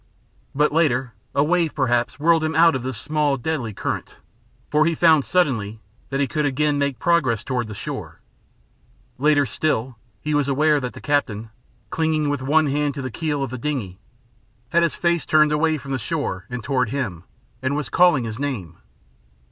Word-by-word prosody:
But 150 +2 +3
later 135 -6 +1 0.2
a 140 - +4
wave 170 0 +1
perhaps 120 -2 0
whirled 165 +1 +3
him 160 0 -1
out 165 0 +6
of 130 - -2
this 130 -2 -4
small, 150 0 0
deadly 130 -4 -2
current, 100 - -4 0.6
for 155 +1 +4
he 165 - +1
found 160 -3 +5
suddenly 115 - 0 0.3
that 135 - -2
he 140 - +3
could 150 +2 -1
again 145 +1 +1
make 140 -3 0
progress 130 -7 +1
toward 125 -3 -2
the 105 - -7
shore. - - -6 1.0
Later 145 0 +4
still, 125 -2 -2 0.2
he 150 +5 -3
was 145 -2 +2
aware 150 +2 +3
that 125 -2 -5
the - - -11
captain, 115 -7 -1 0.4
clinging 155 -2 0
with 145 -2 -1
one 155 +4 +3
hand 145 0 0
to 140 - -5
the 130 - -4
keel 150 0 -2
of 135 - -4
the 130 - -5
dingey, 115 -10 -3 0.7
had 170 +5 +3
his 170 -2 +1
face 170 -2 +1
turned 155 -1 +4
away 155 +1 +2
from 135 -1 -9
the 135 - -1
shore 95 -3 -3
and 125 -2 -5
toward 130 -3 0
him, 105 -11 -3 0.4
and 130 +2 -1
was 150 -1 -3
calling 175 -8 +4
his 115 0 -5
name. 115 - -4
140 Hz, 185 wpm, -22 LUFS, 125-155 Hz, 1.0 s, out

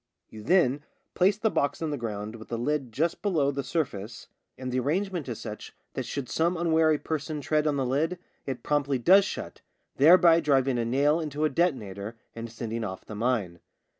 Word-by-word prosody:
You 110 - -10
then 145 - +2 0.3
place 190 +2 +3
the 220 0 +1
box 140 - 0
in 160 -2 -2
the - - -1
ground 110 -3 -5
with 110 - -12
the 115 - -3
lid 135 0 -1
just 160 +9 -1
below 160 -9 +1
the 140 0 -3
sur 155 +4 0
face, 110 -1 -9 0.3
and 130 -1 -5
the 130 - +1
arrangement 170 +2 -1
is 115 - -5
such 105 -2 -8 0.2
that - - -4
should 140 -3 -4
some 170 +6 0
unwary 160 -2 +3
person 155 0 -3
tread 150 +2 +1
on 150 - +1
the 135 -2 0
lid 155 +8 0 0.3
it 130 -3 -4
promptly 145 -2 +1
does 190 +11 +6
shut, - - -6 0.4
thereby 170 +3 +7
driving 135 -5 +2
a 115 - 0
nail 140 +6 +2
into 150 -1 -2
a - - +2
detonator 110 - -1 0.2
and 115 0 -7
sending 115 0 -4
off 95 -3 -6
the - - -8
mine. 105 -6 -1
140 Hz, 195 wpm, -27 LUFS, 115-160 Hz, 0.4 s, thereby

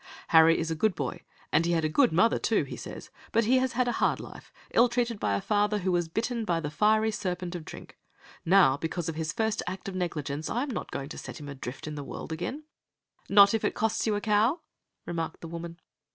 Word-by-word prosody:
"Harry 160 0 +6
is 165 0 -2
a - - 0
good 210 +4 +1
boy, - - -4 0.3
and 165 +2 +3
he 170 - +2
had 165 -2 +1
a - - +3
good 245 - +3
mother, 185 +8 +3
too, - - +1
he - - -7
says, - - -9 0.2
but 230 - +3
he 255 +3 +4
has 260 -1 0
had 250 +1 +1
a - - +2
hard - - +2
life, - - -11 0.2
ill 240 +1 +5
treated 235 -2 -1
by 100 -1 0
a - - 0
father 210 0 +1
who 190 -2 -1
was 175 -2 +1
bitten 230 +6 -2
by 175 -6 0
the 150 -2 -4
fiery 215 +6 +3
serpent 180 -5 -3
of 175 -3 -5
drink. - - -11 0.4
Now 175 -7 +5
because 165 +2 -3
of - - -3
his 155 0 -3
first 220 -2 -1
act 185 +2 -5
of 195 - -4
negligence 155 -5 -3
I 245 - 0
am 285 - -4
not - - -4
going 140 0 -5
to - - -7
send - - -8
him 145 -3 -8
adrift 135 -2 -7
in 155 - -5
the 145 -1 -5
world 150 - -7
again." 255 - -4 0.7
"Not 200 0 +7
if 225 - 0
it - - 0
costs 220 +1 0
you 215 - +2
a 205 - -2
cow!" 220 - +2 0.4
remarked 165 -1 -4
the 165 - -7
woman. 170 +1 -7
180 Hz, 240 wpm, -28 LUFS, 160-220 Hz, 0.7 s, Not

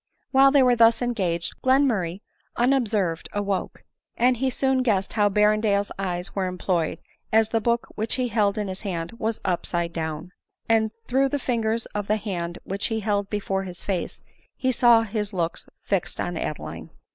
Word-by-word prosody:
While 270 0 +7
they 275 -1 +5
were 250 -1 +4
thus 230 +1 +5
engaged, 185 -8 -1
Glenmurray, 230 -10 +2 0.4
unobserv 225 -9 +2
ed, - - -12
awoke; 200 -2 -2 0.3
and 250 +1 +3
he 265 +2 +1
soon 265 0 +1
guessed 205 -6 0
how 210 -2 +3
Berrendale's 210 0 +2
eyes 180 -1 -3
were 190 -2 -1
employed, 180 -2 -1 0.3
as 220 0 +4
the 225 0 0
book 235 +1 +1
which 220 +1 -1
he 255 -1 -1
held 210 -2 +1
in 210 -1 -1
his 190 0 -5
hand 170 -5 -4
was 225 0 -1
upside 170 -1 -1
down; 160 +1 -4 0.4
and 225 -1 +3 0.2
through 270 +2 +2
the 285 - 0
fingers 230 -3 -1
of 205 -1 -3
the 215 - +2
hand 175 -5 -4
which 195 +1 -2
he 220 -1 -2
held 205 -1 0
before 195 -2 -1
his 180 -2 -8
face, 190 -4 -3 0.3
he 260 - +1
saw 235 -2 +5
his 210 -1 -3
looks 170 -2 -3
fixed - - -2
on - - -2
Adeline. - - -5
210 Hz, 175 wpm, -24 LUFS, 190-235 Hz, 0.4 s, While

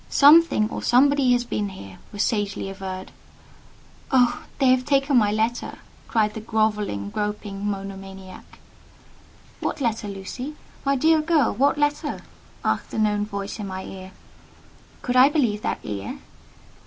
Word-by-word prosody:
"Something 290 -6 +6
or - - -4
somebody 270 +1 +4
has 245 0 +2
been 210 -4 -2
here," 100 - -11
was 205 0 -1
sagely 205 -3 -1
averred. 190 -1 -7 1.0
"Oh! 250 -3 +3
they 275 - +1
have 255 0 +4
taken 275 0 +2
my 210 -4 +4
letter!" 220 +3 -1 0.3
cried 215 -2 +1
the 220 - -6
grovelling, 210 - -1
groping, 210 -1 -4
monomaniac. 195 -1 -8 1.0
"What - - -3
letter, 225 -5 -1
Lucy? 205 +9 -6 0.3
My 275 0 +2
dear 315 +3 +4
girl, 305 -5 +2
what 275 +7 +2
letter?" 295 0 -1 0.4
asked - - -1
a - - -2
known 210 -1 +1
voice 200 +1 -5
in 205 - -4
my 190 0 -5
ear. 190 0 -9 0.9
Could 250 - -1
I 260 +2 +8
believe 240 -9 +1
that - - -1
ear? 100 -1 -5
215 Hz, 140 wpm, -24 LUFS, 195-270 Hz, 1.0 s, I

